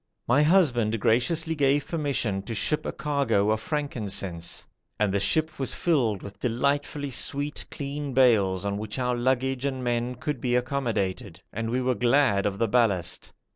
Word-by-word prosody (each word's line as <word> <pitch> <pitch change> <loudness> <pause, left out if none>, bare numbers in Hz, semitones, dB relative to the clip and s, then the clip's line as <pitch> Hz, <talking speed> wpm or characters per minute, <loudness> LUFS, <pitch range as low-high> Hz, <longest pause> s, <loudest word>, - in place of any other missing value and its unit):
My 125 +5 +4
husband 130 - +3
graciously 155 +9 +1
gave 145 -1 +2
permission 140 - -1
to 115 - -2
ship 150 +7 0
a - - -1
cargo 130 -9 +1
of 110 - +1
frankincense, 100 - -3 0.3
and 105 -2 +2
the 100 - +2
ship 155 +11 +1
was 135 - -1
filled 120 - +1
with 100 0 -10
delightfully 140 +3 -1
sweet, 145 +4 -1
clean 140 0 -5
bales, 105 -8 +3
on 100 0 -1
which 110 +2 -5
our 125 -1 0
luggage 130 +1 0
and 130 -2 -2
men 120 +1 -1
could 150 -1 -4
be 120 -1 +1
accommodated, 115 -7 -2
and 115 +2 -3
we 125 +2 0
were 130 0 +1
glad 120 -5 +3
of 100 -1 -3
the 115 - +1
ballast. 105 -6 +1
125 Hz, 165 wpm, -26 LUFS, 110-140 Hz, 0.3 s, My